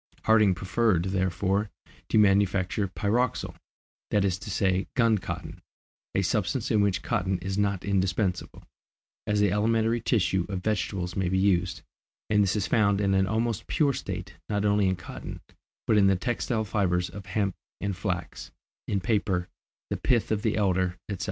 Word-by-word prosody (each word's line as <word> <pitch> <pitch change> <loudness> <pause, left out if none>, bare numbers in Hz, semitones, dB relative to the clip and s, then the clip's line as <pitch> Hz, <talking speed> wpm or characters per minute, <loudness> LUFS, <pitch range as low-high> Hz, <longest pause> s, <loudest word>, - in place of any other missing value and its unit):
Harding 110 -4 +5
preferred, 95 0 +1
therefore, 95 +2 0 0.4
to - - +2
manufacture 100 -1 +3
pyroxyle, 100 +8 -1 0.6
that 100 -2 +2
is 95 -1 0
to 110 - -8
say 95 -1 +1
gun 115 -5 +3
cotton, - - -6 0.5
a - - +2
substance - - 0
in 105 - +4
which 100 -2 +1
cotton 95 0 0
is 95 +2 -4
not 100 -2 0
indispensable, 95 -1 -1 0.6
as 105 -1 +1
the 105 -2 +3
elementary 115 +3 +1
tissue 95 -6 +1
of 95 -2 -4
vegetables 95 -4 -2
may 95 -2 0
be 95 - +1
used, 95 -2 +1 0.5
and 105 -1 +4
this 95 -1 +2
is 105 -4 0
found 100 +2 +2
in 100 -1 +2
an 95 0 +3
almost 110 +1 -1
pure 145 -3 +2
state, - - -5 0.2
not 105 0 0
only 100 -1 +3
in 95 - +1
cotton, 90 - -8 0.5
but 110 - +3
in 100 -1 +5
the 95 - +4
textile 115 +2 -1
fibres 90 -4 0
of 100 0 -10
hemp 100 0 0 0.3
and 100 -1 -2
flax, 90 -2 -4 0.4
in 100 - 0
paper, 95 -3 0 0.4
the - - 0
pith 120 -4 +1
of 105 -1 +1
the 110 0 0
elder, 95 -3 +1
etc. 100 -3 -4
100 Hz, 165 wpm, -27 LUFS, 95-105 Hz, 0.6 s, Harding